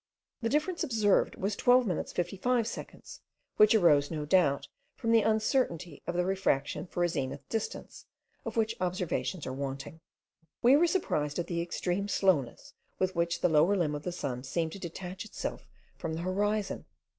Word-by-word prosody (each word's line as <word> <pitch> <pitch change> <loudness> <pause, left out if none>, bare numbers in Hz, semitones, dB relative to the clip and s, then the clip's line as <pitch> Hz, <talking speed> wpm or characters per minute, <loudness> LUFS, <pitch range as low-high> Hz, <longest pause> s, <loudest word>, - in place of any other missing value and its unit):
The 230 - 0
difference 310 +6 0
observed 220 -8 +2
was 200 +2 -2
12 250 +3 +4
minutes 180 -6 -2
55 220 +7 0
seconds, 230 - -8 0.4
which 215 +1 +6
arose 150 -8 +5
no 155 -2 -3
doubt 145 -4 +3 0.3
from 230 -2 -1
the 230 -1 +6
uncertainty 215 - 0
of 175 - -2
the 180 0 +1
refraction 185 -5 0
for 175 - -1
a - - +4
zenith 140 -3 -4
distance, 225 -2 -5 0.4
of - - -5
which 220 -1 +2
observations 180 -1 -2
are 130 - -4
wanting. 135 +3 -5 0.6
We 250 +3 +7
were 340 +4 +5
surprised 150 - 0
at 175 - -1
the 170 -1 -2
extreme 180 +3 -2
slowness 175 -12 +1 0.2
with 185 0 0
which 170 0 0
the 180 - +3
lower 160 +5 +4
limb 160 -5 +1
of 145 - -4
the 180 - -3
sun 135 -7 -4
seemed 160 +4 -2
to 200 - -8
detach 180 +1 -6
itself 220 - -6 0.3
from 160 -1 -3
the 165 - -4
horizon. 205 +3 -1
180 Hz, 170 wpm, -30 LUFS, 155-215 Hz, 0.6 s, We